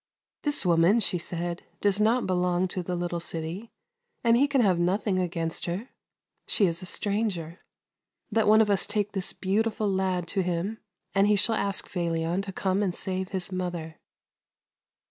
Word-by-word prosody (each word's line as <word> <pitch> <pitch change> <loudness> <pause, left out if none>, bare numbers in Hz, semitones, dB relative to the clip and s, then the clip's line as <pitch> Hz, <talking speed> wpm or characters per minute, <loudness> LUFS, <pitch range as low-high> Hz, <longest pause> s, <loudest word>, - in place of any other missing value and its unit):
" - - -67
This 295 -8 +2
woman," 175 +5 +4
she 185 -4 0
said, 170 +1 -3
" - - -38
does 205 0 +2
not 230 +3 +3
belong 180 0 +1
to 185 - -3
the 180 +1 -3
little 175 0 -2
city, 170 +6 -5 0.5
and 230 -1 +5
he 275 +4 +4
can 275 -2 +2
have 185 -6 +3
nothing 185 +2 +1
against 165 -2 -2
her; 190 +9 -3 0.6
she 205 - +3
is 170 -2 +1
a 185 - -6
stranger. 200 -5 -1 0.7
Let 220 0 +2
one 215 +1 +7
of 210 -2 +3
us 195 - +2
take 205 0 -1
this 190 -3 -1
beautiful 215 +2 0
lad 190 -2 0
to 195 - 0
him, 180 +4 -2 0.3
and 195 +1 +4
he 210 - +4
shall 210 +3 +2
ask 200 -2 -1
Felion 170 0 -1
to 195 0 -6
come 190 +1 0
and 185 -4 0
save 190 -1 -3
his 190 -1 -4
mother." 175 -3 -4
190 Hz, 180 wpm, -27 LUFS, 175-210 Hz, 0.7 s, one